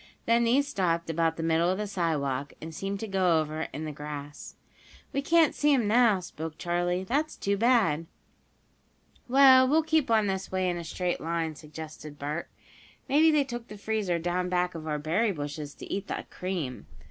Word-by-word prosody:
Then 235 +1 +3
these 270 +5 +3
stopped 170 -8 0
about 165 0 0
the 165 - -3
middle 165 +1 +2
of 185 - 0
the 210 - -2
sidewalk, 145 -8 -2
and 160 +1 -8
seemed 195 +5 -4
to 220 - -3
go 185 -4 +2
over 155 +1 -3
in 150 +3 -5
the 155 - -4
grass. 145 0 -8 0.6
"We 275 - 0
can't 325 +1 +4
see 295 0 +2
'em 235 -5 +1
now," 220 -3 +4
spoke 160 -2 -7
Charley. 175 +1 -1
"That's 290 +9 -1
too 200 0 -1
bad." 200 -9 +2 1.2
"Well, 260 0 +7
we'll 315 +4 +3
keep 315 -4 +1
on 220 -2 +4
this 190 -1 -3
way 185 0 0
in 175 -1 -1
a 170 - -5
straight 175 +2 -2
line," 165 -1 -2
suggested 155 -1 -10
Bert. 150 +4 -4 0.6
"Maybe 300 +4 +5
they 300 -2 +4
took 240 -3 -7
the 210 - -10
freezer 205 -4 -1
down 175 +2 -1
back 180 0 0
of 160 -1 -7
our 150 -1 -1
berry 175 +9 +1
bushes 145 -2 -6
to - - -7
eat 195 0 -3
the - - -4
cream." 175 -9 -4
180 Hz, 190 wpm, -28 LUFS, 160-230 Hz, 1.2 s, Well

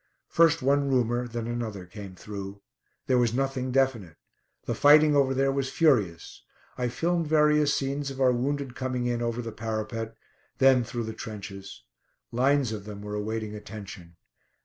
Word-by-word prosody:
First 165 -4 +4
one 140 +1 +2
rumour 125 -1 +1
then 120 -1 -4
another 115 -5 -4
came 95 +1 -10
through. 100 0 -7 0.5
There 125 -1 +3
was 120 -1 +1
nothing 135 -1 -1
definite. 125 - 0 0.5
The - - -1
fighting 150 +1 +6
over 135 -2 +3
there 135 +1 +2
was 135 -1 -1
furious. 110 - +1 0.3
I 125 -1 -1
filmed 165 +6 0
various 150 -1 +4
scenes 140 +1 -2
of 135 -1 -8
our 130 -1 +5
wounded 135 +1 -2
coming 125 -1 -2
in 120 -1 -1
over 120 0 -2
the 115 - -5
parapet; 110 0 -4 0.4
then 130 -2 +5
through 120 0 -4
the 110 0 -5
trenches. 100 -3 -8 0.5
Lines 135 0 +2
of 105 -2 -6
them 105 -1 -8
were 105 0 -6
awaiting 110 +1 -3
attention. 100 -4 -9
120 Hz, 160 wpm, -27 LUFS, 110-135 Hz, 0.5 s, fighting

